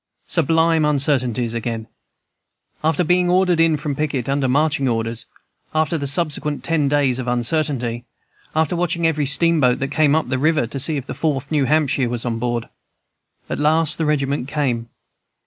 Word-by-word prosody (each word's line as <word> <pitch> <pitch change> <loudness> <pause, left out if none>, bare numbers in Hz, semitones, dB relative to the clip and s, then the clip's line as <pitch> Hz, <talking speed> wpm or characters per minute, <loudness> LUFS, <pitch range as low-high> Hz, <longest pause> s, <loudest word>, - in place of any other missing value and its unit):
'" - - -47
"Sublime 165 0 +2
uncertainties 130 -5 +1
again! 115 -1 -4 1.0
"After 160 +2 +2
being 180 +2 +2
ordered 180 -1 +3
in 165 -2 +3
from 145 -1 -3
picket, 140 -4 -2
under 135 -1 0
marching 145 +1 +1
orders; 115 -1 -1 0.5
after 155 +1 +1
the 140 -3 -2
subsequent 150 0 0
ten 160 -4 +1
days 135 -3 +1
of 130 - -4
uncertainty; 120 -1 -1 0.5
after 160 +2 +1
watching 170 -1 -1
every 155 -3 +1
steamboat 140 -3 +2
that 135 - -3
came 150 0 +3
up 160 -6 0
the 130 -1 -1
river, 155 -1 +2
to 135 +4 -6
see 150 +3 +1
if 135 - -5
the - - -6
Fourth 145 -4 -2
New 145 -3 +2
Hampshire 140 -4 +1
was 120 0 -4
on 115 -2 -2
board, 120 -1 -2 0.8
at - - -4
last 155 +1 +2
the 160 - +1
regiment 140 -3 0
came. 130 -6 -2
145 Hz, 170 wpm, -20 LUFS, 125-160 Hz, 1.0 s, ordered